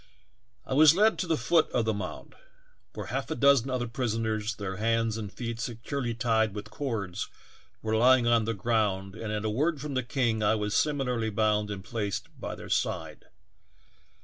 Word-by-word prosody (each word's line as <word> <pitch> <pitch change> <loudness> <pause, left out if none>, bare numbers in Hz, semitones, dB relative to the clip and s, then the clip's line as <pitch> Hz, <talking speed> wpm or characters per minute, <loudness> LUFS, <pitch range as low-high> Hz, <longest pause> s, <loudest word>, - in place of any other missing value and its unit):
" 120 +1 -41
I - - -3
was 155 +3 +7
led 215 +3 +4
to 185 - -1
the 165 -1 +1
foot 165 +1 +3
of 120 -2 0
the 110 - +1
mound, 105 0 -6 0.6
where - - -5
half - - -2
a - - -2
dozen 140 -2 +4
other 125 -1 -1
prisoners, 115 -3 -1
their 95 -2 -5
hands 115 0 +1
and 105 -3 -5
feet 115 +3 -5
seeurely 120 +1 -3
tied 110 -2 +1
with 105 0 -6
eords, 105 -9 -3 0.6
were 110 0 0
lying 125 +2 +5
on 120 -2 +3
the 115 0 -1
ground 100 -2 0
and 110 0 -5
at 105 0 -2
a - - +1
word 150 +7 0
from 145 0 -5
the 130 - +1
king 120 -3 0
I 105 +1 +3
was 105 -1 -2
similarly 125 -7 +1
bound 105 0 +1
and 100 -2 -5
placed 105 -2 -3
by - - -5
their - - -10
side. - - -2
115 Hz, 190 wpm, -28 LUFS, 105-130 Hz, 0.6 s, was